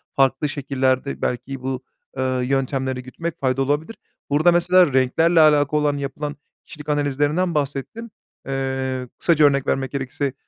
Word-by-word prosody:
farklı 135 +2 +2
şekillerde 135 -1 -1
belki 130 +2 -3
bu, 130 0 -4 0.3
eee, 130 -1 0
yöntemleri 130 -1 -1
gütmek 165 +6 -6
faydalı 135 0 0
olabilir. 150 +10 -1 0.3
Burada 155 +5 +4
mesela 175 -2 +4
renklerle 160 +6 +3
alakalı 150 -1 +4
olan 145 -1 +1
yapılan 140 +1 -4 0.3
kişilik 150 -1 -10
analizlerinden 145 +4 0
bahsettin. 145 - -3 0.4
Eee, 130 -1 -2
kısaca 155 -3 +4
örnek 140 -1 +2
vermek 135 -1 -1
gerekirse 135 0 -3
140 Hz, 130 wpm, -22 LUFS, 130-150 Hz, 0.4 s, Burada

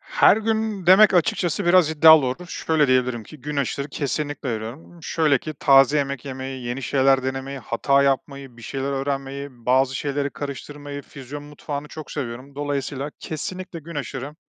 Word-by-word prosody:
Her - - +4
gün 220 -3 -1
demek 190 +3 +7
açıkçası 175 +2 +1
biraz 175 -3 +5
iddialı 160 -2 +7
olur. 150 +8 -4
Şöyle 160 -3 +1
diyebilirim 125 -2 +1
ki, 155 +3 -13
günaşırı 140 0 -2
kesinlikle 145 -2 -3
giriyorum. 120 +10 -8
Şöyle 150 -3 +2
ki, 155 +4 -7
taze 135 0 +5
yemek 140 -3 -3
yemeyi, 130 -1 -6
yeni 120 +3 -4
şeyler 135 0 +3
denemeyi, 135 +1 -4
hata 140 +3 +1
yapmayı, 135 -2 -2
bir 115 - -14
şeyler 135 +3 -3
öğrenmeyi, 135 0 -3
bazı 130 +2 +1
şeyleri 140 0 -2
karıştırmayı, 145 +1 -7
füzyon 140 +1 -9
mutfağını 145 0 -7
çok 155 0 -9
seviyorum. 130 0 -6
Dolayısıyla 145 0 -3
kesinlikle 180 +3 -6
günaşırı 145 -3 -6
140 Hz, 150 wpm, -23 LUFS, 135-150 Hz, -, demek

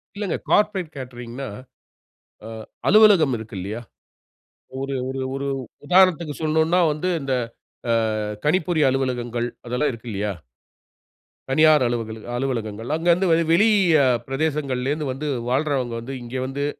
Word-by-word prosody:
இல்லங்க. 200 -3 -2
கார்ப்பரேட் 190 -6 +1
கேட்டரிங்ன்னா 125 0 -7 1.0
ஆ - - -7 0.4
அலுவலகம் 195 - +6
இருக்கு 110 -1 -9
இல்லையா? 105 +6 -5 1.0
ஒரு, 135 0 -3
ஒரு, 135 0 -4 0.2
ஒரு 140 0 -3 0.4
உதாரணத்துக்கு 175 -3 +4
சொல்லனுன்னா 160 +3 +2
வந்து 155 +5 -2
இந்த 135 -1 -2 0.6
ஆ - - +4 0.5
கணிப்பொறி 165 +1 +1
அலுவலகங்கள் 120 -3 -1 0.2
அதெல்லாம் 125 +5 0
இருக்கு 115 +1 -10
இல்லையா? 100 +1 -2 1.2
தனியார் 155 0 +5
அலுவலக 115 -2 -3
அலுவலகங்கள். 115 -4 -3
அங்க 165 +2 -3
இருந்து 180 +3 +2 0.2
வெளி 205 +7 +5 0.6
பிரதேசங்களிலிருந்து 140 0 -1
வந்து 140 +4 -5 0.2
வாழ்றவங்க 130 -2 0
வந்து 130 +4 -7
இங்கே 120 +2 -5
வந்து 140 +2 -3
135 Hz, 115 wpm, -22 LUFS, 120-160 Hz, 1.2 s, அலுவலகம்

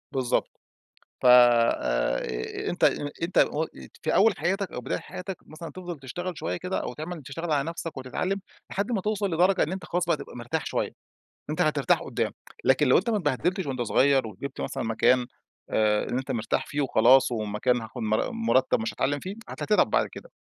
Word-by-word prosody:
بالضبط. 130 -2 0 0.7
ف - - -4
آآ، 115 - +3
أنت - - -4 0.4
أنت 175 - -2
و 155 +2 +3
ات - - -11
في 155 - +1
أول 210 -1 +5
حياتك 190 +1 -1
أو 125 - -5
بداية - - -2
حياتك 185 0 -7
مثلًا 160 +2 -9
تفضل 175 -4 -7
تشتغل 175 +6 -5
شوية - - -2
كده 180 +1 -2
أو - - -4
تعمل 160 +2 -6
تشتغل 165 +4 -5
على 145 +2 +1
نفسك 165 -3 -6
وتتعلم، 180 +10 -2 0.3
لحد 200 +5 -1
ما 200 -5 0
توصل 205 -3 -1
لدرجة 180 +3 +3
إن 160 - -2
أنت 190 - -5
خلاص 175 0 -1
بقى 165 -3 +1
تبقى - - -10
مرتاح 120 0 -3
شوية. - - -1 0.6
أنت - - -1
هترتاح - - +2
قدام، - - -2 0.3
لكن 135 +2 +4
لو 130 - +6
أنت 200 - 0
ما 215 - +2
اتبهدلتش 175 +4 0
وأنت 130 -3 -3
صغير 135 +1 +3
وجبت 130 +7 -7
مثلًا - - -3
مكان، 120 +2 +2 0.4
آآ، 105 -1 +2
إن 125 - -1
أنت 130 +1 -3
مرتاح 115 -3 -1
فيه 145 0 -2
وخلاص، 130 -1 +5
ومكان 110 +2 0
هاخد 115 +2 -8
مر 110 - 0
مرتب 230 - +2
مش 110 -1 -3
هاتعلم 145 +6 0
فيه، 190 +6 -6
هت - - -8
تتعب 210 - +3
بعد - - +2
كده. - - -12
145 Hz, 190 wpm, -26 LUFS, 125-180 Hz, 0.7 s, لو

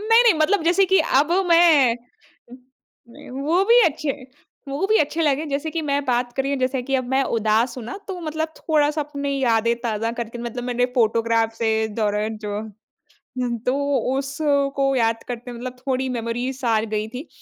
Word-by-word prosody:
नहीं, 455 +2 +5
नहीं, 465 -5 +5
मतलब 320 +4 +2
जैसे 360 +3 +4
कि 380 +1 +4
अब 305 0 +2 0.2
मैं 315 -8 +5 1.1
नहीं, 235 - -13
वो 305 +9 +1
भी 470 +3 +6
अच्छे 295 -2 -1 0.6
वो 280 +8 -1
भी 435 +2 +3
अच्छे 305 +2 0
लगे। 295 0 +1
जैसे 285 +3 -2
कि 330 0 -3
मैं 285 -1 -1
बात 245 -2 0
कर 270 - 0
रही 275 +1 -2
हूँ 280 - -1
जैसे 255 0 0
कि 270 - 0
अब 255 - -2
मैं 270 - +3 0.2
उदास 225 +3 +1
हूँ 235 - -7
ना, 240 - -6
तो 370 -2 -5
मतलब 315 0 -3
थोड़ा-सा 300 -1 +1
अपनी 280 -1 -4
यादें 230 -1 +2
ताज़ा 225 -1 -1
करके, 235 0 -5
मतलब 240 +1 -5
मैंने 245 0 0
फ़ोटोग्राफ़ 230 -1 +1
से, 220 -1 0
इस 220 - -4
दौरान 210 0 -1
जो 205 0 -3 0.8
हुँ, 245 -1 -1
तो 250 - +2 0.4
उसको 280 0 0
याद 230 -1 +1
करते 245 0 -6
मतलब 245 +1 -7
थोड़ी 260 0 -2
मेमरीज़ 245 +3 -3
आ 225 -1 +3
गई 215 0 -1
थी। 260 +6 -7
265 Hz, 185 wpm, -22 LUFS, 230-305 Hz, 1.1 s, भी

